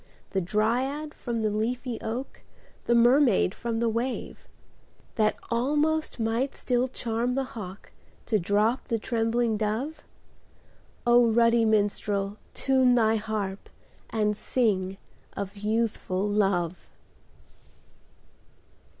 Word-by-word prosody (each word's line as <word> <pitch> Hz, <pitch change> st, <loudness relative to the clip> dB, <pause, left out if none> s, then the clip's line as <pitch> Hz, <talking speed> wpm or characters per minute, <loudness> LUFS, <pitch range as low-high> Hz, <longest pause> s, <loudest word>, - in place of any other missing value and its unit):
The 190 Hz, -, 0 dB
dryad 250 Hz, -, 0 dB
from 235 Hz, -3 st, -3 dB
the 215 Hz, -, +1 dB
leafy 235 Hz, +3 st, -2 dB
oak, 240 Hz, +5 st, -5 dB, 0.4 s
The 235 Hz, -, +3 dB
mermaid 240 Hz, -5 st, +4 dB
from 230 Hz, -1 st, -3 dB
the 235 Hz, -, +1 dB
wave; 235 Hz, +3 st, -3 dB, 0.7 s
That 215 Hz, -1 st, +2 dB, 0.2 s
almost 295 Hz, +5 st, +1 dB
might 230 Hz, +4 st, 0 dB
still 250 Hz, 0 st, 0 dB
charm 240 Hz, 0 st, -2 dB
the 270 Hz, -, +1 dB
hawk 195 Hz, -3 st, -8 dB, 0.3 s
To 215 Hz, -3 st, +1 dB
drop 210 Hz, +7 st, +1 dB
the 230 Hz, -, 0 dB
trembling 230 Hz, 0 st, 0 dB
dove? 235 Hz, +9 st, -2 dB, 1.0 s
ruddy 235 Hz, -1 st, +5 dB
minstrel, 205 Hz, -1 st, 0 dB, 0.2 s
time 260 Hz, -2 st, +3 dB
thy 225 Hz, -2 st, +3 dB
harp. 210 Hz, -3 st, -4 dB, 0.4 s
And 210 Hz, -1 st, 0 dB
sing 195 Hz, -5 st, 0 dB, 0.4 s
of 200 Hz, 0 st, -5 dB
Youthful 210 Hz, -2 st, -1 dB
Love 195 Hz, -4 st, +1 dB
225 Hz, 105 wpm, -27 LUFS, 210-245 Hz, 1.0 s, ruddy